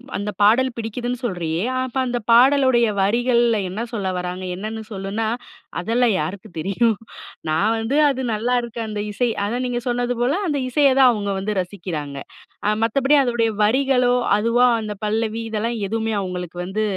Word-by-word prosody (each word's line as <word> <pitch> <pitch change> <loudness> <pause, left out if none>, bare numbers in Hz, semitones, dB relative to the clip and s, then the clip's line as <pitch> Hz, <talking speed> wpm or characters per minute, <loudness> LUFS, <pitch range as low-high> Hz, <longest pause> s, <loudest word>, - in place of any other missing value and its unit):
அந்த 205 +1 -3
பாடல் 235 +6 +5
பிடிக்குதுன்னு 240 +2 -3
சொல்றியே, 175 -6 -2 0.2
அப்ப 260 0 -4
அந்த 245 0 -1
பாடலுடைய 255 -1 +5
வரிகள்ல 235 +2 +2
என்ன 195 +5 -4
சொல்ல 205 -4 -3
வராங்க? 180 +1 -4
என்னன்னு 215 +3 -5
சொல்லுனா, 200 +2 -3 0.5
"அதெல்லாம் 230 +4 +2
யாருக்கு 200 +2 -5
தெரியும். 200 +5 +1 0.5
நான் 160 +8 +2
வந்து 225 +5 -1
அது 265 -1 -2
நல்லாருக்கு 235 +1 -1
அந்த 210 -1 -3
இசை." 240 +3 0 0.2
அதான் 245 +5 -2
நீங்க 240 0 -2
சொன்னது 245 0 0
போல 255 +6 +2
அந்த 290 -2 0
இசைய 280 +2 +4
தான் 260 - +8
அவங்க 205 -2 -2
வந்து 210 +2 -2
ரசிக்கிறாங்க. 170 -7 -6 0.5
அ 210 - +3
மத்தபடி 270 +6 +3
அதோடைய 235 -2 +1
வரிகளோ, 250 +2 +3 0.3
அதுவா 235 +3 +3
அந்த 210 -1 -5
பல்லவி 220 +1 -1
இதெல்லாம் 230 +2 -1
எதுவுமே 225 0 -1
அவங்களுக்கு 180 -2 -5
வந்து 200 +4 -2
225 Hz, 150 wpm, -21 LUFS, 205-245 Hz, 0.5 s, தான்